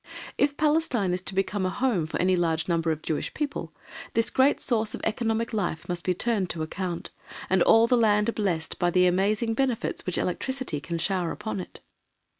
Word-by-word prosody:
If 285 0 +1
Palestine 295 - +1
is 180 - -2
to 190 - -3
become 195 +1 0
a 185 - +1
home 220 -7 0
for - - -4
any 185 +1 +3
large 165 -2 0
number 170 -2 +1
of 155 -1 -2
the - - -14
Jewish 155 - -2
people, 285 - -3 0.4
this 230 0 +1
great 265 +2 +3
source 225 -4 0
of - - -9
economic 225 +1 -1
life 175 -6 -2
must 175 -1 -2
be 180 - 0
turned 210 -3 0
to 160 - -3
account, 175 +1 -4 0.4
and 190 -1 +4
all 225 +5 +6
the 245 - +3
land 215 -1 +3
blessed 180 -7 -2
by 175 -1 +2
the 180 +1 +4
amazing 205 +5 +2
benefits 255 -1 -1
which 185 - -1
electricity 245 - -2
can 165 +3 -4
shower 175 0 0
upon 210 -1 -4
it. 180 - -9
195 Hz, 200 wpm, -26 LUFS, 175-230 Hz, 0.4 s, all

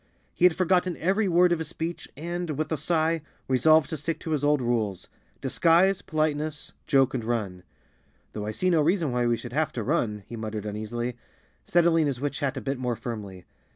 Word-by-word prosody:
He 180 - +3
had 180 -3 +5
forgotten 185 -1 +1
every 195 +4 +1
word 175 0 +4
of 170 - +2
his 160 - -3
speech 165 +1 -5
and, 170 -1 -4
with 155 +1 -2
a - - +2
sigh, 165 +1 +1 0.3
resolved 155 +3 +4
to 160 - -2
stick 155 +2 -3
to 160 - -5
his 150 -2 0
old 145 0 +3
rules—disguise, 125 - 0
politeness, 155 -1 -2
joke 135 -1 +3
and 125 -3 -2
run. 105 -6 -2 0.7
"Though 105 -1 -4
I - - -1
see 185 +11 0
no 165 -3 +4
reason 165 -2 +1
why 120 0 +1
we 120 -1 +2
should 120 0 -8
have 155 +2 +1
to 115 - -3
run," 105 -1 -1
he 120 - -8
muttered 110 -2 -5
uneasily, 115 +3 -4 0.5
settling 170 -2 +3
his 135 -3 -2
witch 145 +1 -3
hat 140 -2 -1
a - - -3
bit 135 -1 -3
more 125 -2 -1
firmly. 105 -7 -7
145 Hz, 195 wpm, -26 LUFS, 120-165 Hz, 0.7 s, had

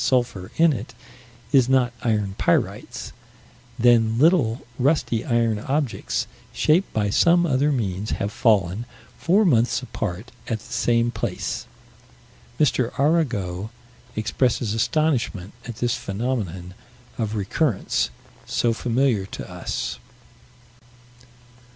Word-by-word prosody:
sulphur 120 -8 0
in 165 -1 +5
it 120 -1 -7 0.6
is 130 -3 +4
not 130 -2 +3
iron 105 -5 0
pyrites - - -1 0.7
then 115 -2 +4
little, 140 -6 +3
rusty 130 -4 +1
iron 115 -3 +1
objects, 135 +2 -1 0.3
shaped 170 +6 +2
by 105 -2 0
some 175 +8 +4
other 145 -1 +2
means, 105 -6 -2
have 100 - -2
fallen, 105 -3 +2 0.4
four 200 +5 +3
months 125 -5 +2
apart, 110 -1 -5 0.2
at 115 - -1
the 120 +3 -11
same 120 0 +2
place. - - -3 0.9
M. 150 - +6 0.3
Arago 120 - 0 0.5
expresses 115 0 0
astonishment 120 - 0
at 120 - -6
this 120 +1 0
phenomenon 100 -6 -3 0.5
of 110 -1 -1
recurrence 105 - 0 0.4
so 120 -1 +1
familiar 120 -4 +1
to - - -7
us. - - -4
120 Hz, 110 wpm, -23 LUFS, 105-135 Hz, 0.9 s, M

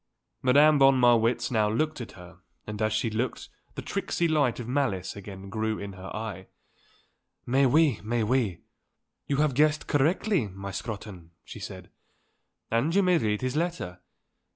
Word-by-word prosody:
Madame 145 +3 +5
von 135 -1 +6
Marwitz 120 -1 +3
now 110 -3 +2
looked 150 +6 -1
at 120 - -8
her 90 -1 -14 0.3
and 105 0 -6
as 110 0 +1
she 110 +1 0
looked 115 +3 -3 0.3
the - - -6
tricksy 170 - -1
light 145 -7 +1
of 120 - -6
malice 120 -9 -1
again 100 -1 -9
grew 110 +1 -2
in 100 -1 -7
her 95 0 -9
eye. 105 -4 -6 1.0
"Mais 135 +2 +3
oui; 145 - +3
mais 115 +1 0
oui. 110 -6 0 0.7
You 140 - 0
have 150 -1 +2
guessed 150 +3 +2
correctly, 160 - +1
my 100 +1 -7
Scrotton," 100 -5 -7
she - - -10
said. - - -9 0.8
"And 135 +10 +1
you 200 - +4
may 180 -2 +4
read 105 -2 -1
his 130 +1 -2
letter. 160 - -2
115 Hz, 160 wpm, -27 LUFS, 105-145 Hz, 1.0 s, von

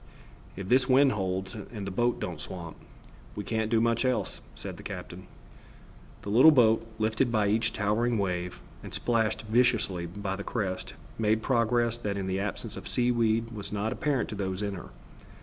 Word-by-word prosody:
"If 95 0 -6
this 125 +3 +3
wind 135 +1 +6
holds 95 -1 -2
and 105 -1 -7
the 95 - -4
boat 120 +5 +1
don't 85 -4 -4
swamp, 85 -3 -6 0.6
we 105 - -4
can't 110 +2 -1
do 115 -1 +3
much 115 +1 +2
else," 130 -1 -1
said - - -7
the - - -10
captain. - - -8 1.0
The - - -5
little 130 +9 +8
boat, 115 -6 +4
lifted 110 +3 +1
by 105 -3 +2
each 110 +2 +2
towering 110 +3 +1
sea, 90 -3 -1 0.3
and - - -7
splashed 115 -3 0
viciously 110 -6 +2
by 95 +2 -4
the 100 - -6
crests, 95 -6 -3 0.3
made 110 0 +2
progress 120 -1 +2
that 100 -3 -2
in 95 - -2
the 95 0 -1
absence 100 0 -4
of - - -7
seaweed 115 -2 +1
was 105 -3 -5
not 105 +2 -1
apparent 145 -6 0
to 110 - -5
those 95 0 -2
in 100 -1 -2
her. 90 - -8
110 Hz, 180 wpm, -28 LUFS, 100-120 Hz, 1.0 s, little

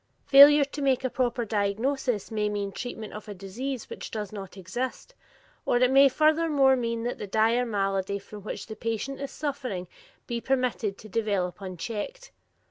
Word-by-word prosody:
Failure 285 +1 +9
to 285 +1 -7
make 265 -2 +2
a 260 - -1
proper 245 -2 0
diagnosis 220 +3 -1
may 210 -1 0
mean 205 -1 -2
treatment 220 -1 -6
of 210 +1 -8
a 205 - -7
disease 230 +7 -5
which - - -7
does 210 -3 -5
not 195 -2 -8
exist, 240 - -5 0.5
or - - +2
it 250 +1 +4
may 275 +1 +7
furthermore 305 -2 +4
mean 230 -2 -2
that 245 - -3
the 205 - -5
dire 225 +4 +2
malady 195 -2 -1
from 205 +1 -11
which 215 - -6
the 220 - -8
patient 230 +5 -3
is 280 - -3
suffering 260 -11 -4 0.4
be 235 -1 -3
permitted 250 -6 0
to 215 - -12
develop 200 -4 -1
unchecked. 210 - -6
230 Hz, 170 wpm, -27 LUFS, 205-265 Hz, 0.5 s, Failure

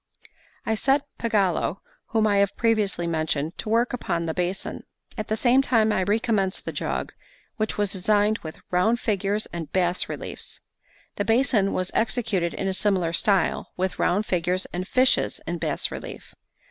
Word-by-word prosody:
I 225 - +1
set 270 +5 +2 0.2
Pagolo, 195 -5 +1 0.3
whom 220 -1 +1
I 205 -2 +3
have 200 0 +2
previously 215 -6 +1
mentioned, 155 -1 -1
to - - -4
work 235 +3 +2
upon 170 -8 -1
the 160 - -2
basin. 180 +3 -2 0.3
At 215 -2 -4
the 220 - -1
same 250 +3 +4
time 225 -5 +3
I 190 - +1
recommenced 205 -1 0
the - - -3
jug, - - -3 0.4
which 215 -2 -1
was 205 -2 0
designed 210 +3 +2
with 155 -1 -9
round 215 +7 +3
figures 205 -1 0
and 170 -2 -5
bas 180 -1 +1
reliefs. - - -6 0.6
The 205 - 0
basin 225 -4 +3
was 185 0 -1
executed 220 -7 0
in 195 - -2
a 190 - 0
similar 185 -4 +1
style, 195 0 +1
with 185 0 -2
round 200 +4 +2
figures 180 0 0
and 180 +1 -3
fishes 255 +3 +3
in - - -3
bas - - -1
relief. - - -8
200 Hz, 165 wpm, -25 LUFS, 180-220 Hz, 0.6 s, same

